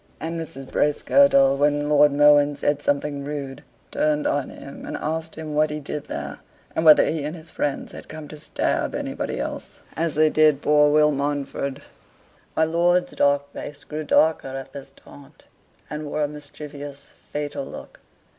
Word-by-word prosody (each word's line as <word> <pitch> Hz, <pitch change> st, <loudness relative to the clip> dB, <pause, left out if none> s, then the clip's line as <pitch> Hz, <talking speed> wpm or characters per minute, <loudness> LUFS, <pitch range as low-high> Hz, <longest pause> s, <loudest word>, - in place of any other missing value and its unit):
And 165 Hz, +1 st, -4 dB
Mrs. 135 Hz, -4 st, -8 dB
Bracegirdle, 145 Hz, -, +4 dB
when 145 Hz, 0 st, +2 dB
my 145 Hz, -, -3 dB
Lord 145 Hz, 0 st, +6 dB
Mohun 145 Hz, 0 st, +5 dB
said 145 Hz, 0 st, 0 dB
something 145 Hz, 0 st, -1 dB
rude, 140 Hz, -2 st, -6 dB, 0.3 s
turned 150 Hz, -1 st, +1 dB
on 145 Hz, -2 st, 0 dB
him, 140 Hz, -, -10 dB
and -, -, -5 dB
asked 160 Hz, +1 st, -4 dB
him 155 Hz, -1 st, -6 dB
what 155 Hz, +1 st, +3 dB
he 150 Hz, 0 st, -4 dB
did 150 Hz, 0 st, -5 dB
there, -, -, -6 dB, 0.4 s
and 160 Hz, -, 0 dB
whether 155 Hz, -2 st, +8 dB
he 155 Hz, -2 st, -1 dB
and 150 Hz, +3 st, -4 dB
his 165 Hz, -1 st, -12 dB
friends 145 Hz, -2 st, -2 dB
had -, -, -10 dB
come 155 Hz, -1 st, -8 dB
to 155 Hz, -, -9 dB
stab -, -, -1 dB
anybody -, -, -3 dB
else, -, -, -6 dB
as 165 Hz, -2 st, -1 dB
they 155 Hz, 0 st, +4 dB
did 155 Hz, -2 st, +4 dB
poor 150 Hz, 0 st, +5 dB
Will 150 Hz, 0 st, +5 dB
Mountford? 140 Hz, -1 st, -3 dB, 0.7 s
My 160 Hz, -, +3 dB
lord's 175 Hz, +2 st, +2 dB
dark 140 Hz, 0 st, +1 dB
face 145 Hz, -1 st, -8 dB
grew 155 Hz, +3 st, -5 dB
darker 155 Hz, 0 st, +3 dB
at 135 Hz, 0 st, -7 dB
this 140 Hz, -1 st, -9 dB
taunt, 145 Hz, +1 st, -17 dB, 0.4 s
and 150 Hz, +1 st, -5 dB
wore 150 Hz, +1 st, -1 dB
a -, -, +1 dB
mischievous, 145 Hz, -1 st, -9 dB, 0.2 s
fatal 145 Hz, -1 st, -3 dB
look. -, -, -10 dB
150 Hz, 175 wpm, -23 LUFS, 145-155 Hz, 0.7 s, whether